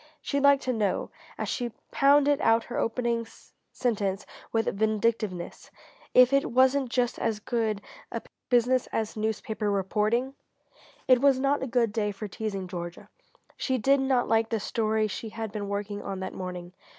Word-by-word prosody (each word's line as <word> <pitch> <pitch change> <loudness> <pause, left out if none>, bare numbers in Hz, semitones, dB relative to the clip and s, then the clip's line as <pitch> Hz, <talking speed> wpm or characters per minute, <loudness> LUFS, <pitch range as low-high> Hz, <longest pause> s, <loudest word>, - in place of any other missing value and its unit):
She'd 280 -1 -1
like 280 0 +6
to 255 - -1
know 210 -4 -1 0.3
as - - -3
she 240 -2 -2 0.2
pounded 285 0 +4
out 225 0 +4
her 240 - -4
opening 230 0 -1 0.4
sentence 205 -5 -1 0.3
with 225 -1 +1
vindictiveness 215 -3 -1 0.5
if 255 +1 +7
it 275 0 +3
wasn't 260 +1 +3
just 245 0 0
as 220 -2 -1
good 215 -2 -1 0.3
a - - -4 0.3
business 250 +1 +3
as 220 -1 -3
newspaper 220 0 -2
reporting? 210 +6 0 0.7
It 255 -1 +5
was 275 -2 +4
not 275 +2 +1
a 265 - -2
good 235 -3 +1
day 210 -2 0
for 205 +2 -6
teasing 200 -2 -4
Georgia. 175 -1 -7 0.5
She 260 -1 0
did 275 +4 +3
not 265 -2 +1
like 225 0 +2
the 225 - 0
story 215 +1 0
she 220 +2 -5
had 220 -1 -5
been 205 -2 -4
working 205 0 -3
on 195 -1 -5
that 190 - -4
morning. 180 -1 -6
225 Hz, 160 wpm, -27 LUFS, 205-255 Hz, 0.7 s, if